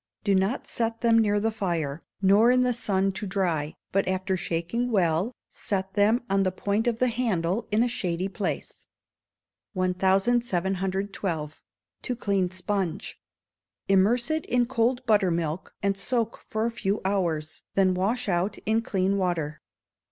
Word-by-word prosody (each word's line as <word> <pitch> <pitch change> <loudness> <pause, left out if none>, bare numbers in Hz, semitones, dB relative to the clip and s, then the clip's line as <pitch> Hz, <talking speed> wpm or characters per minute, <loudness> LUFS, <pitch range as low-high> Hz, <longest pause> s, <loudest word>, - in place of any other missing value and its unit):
Do 200 -2 +2
not 195 +6 +1
set 230 -1 -2
them 230 -1 +5
near 205 -2 +3
the 225 +2 0
fire, 170 -8 -2 0.2
nor 205 +5 +6
in 250 0 +4
the 250 0 +2
sun, 195 -4 0
to 205 +2 -5
dry, 170 -6 -1 0.2
but 195 0 +1
after 190 0 0
shaking 175 +8 -2
well, 185 0 +2 0.2
set 190 -2 -3
them 215 +5 +3
on 195 -1 +2
the 185 -1 +1
point 205 +5 -1
of 235 -2 +1
the 255 +1 +2
handle 220 -4 -1
in 215 +3 +3
a - - +2
shady 185 -6 -2
place. 195 0 -4 0.9
1712. 190 -3 0 0.4
To 250 - -2
Clean 200 -5 0
Sponge. 190 0 -3 0.7
Immerse 215 +8 +3
it 315 -1 -1
in 245 -1 +2
cold 245 +1 0
buttermilk, 180 -6 +1
and 200 0 +2
soak 230 +3 -2
for 220 +1 0
a 235 - 0
few 205 -2 -1
hours, 170 -6 -1
then 190 -1 +4
wash 215 +7 0
out 180 +2 0
in 220 +1 +2
clean 195 -2 0
water. 160 -6 -1
195 Hz, 150 wpm, -26 LUFS, 185-225 Hz, 0.9 s, nor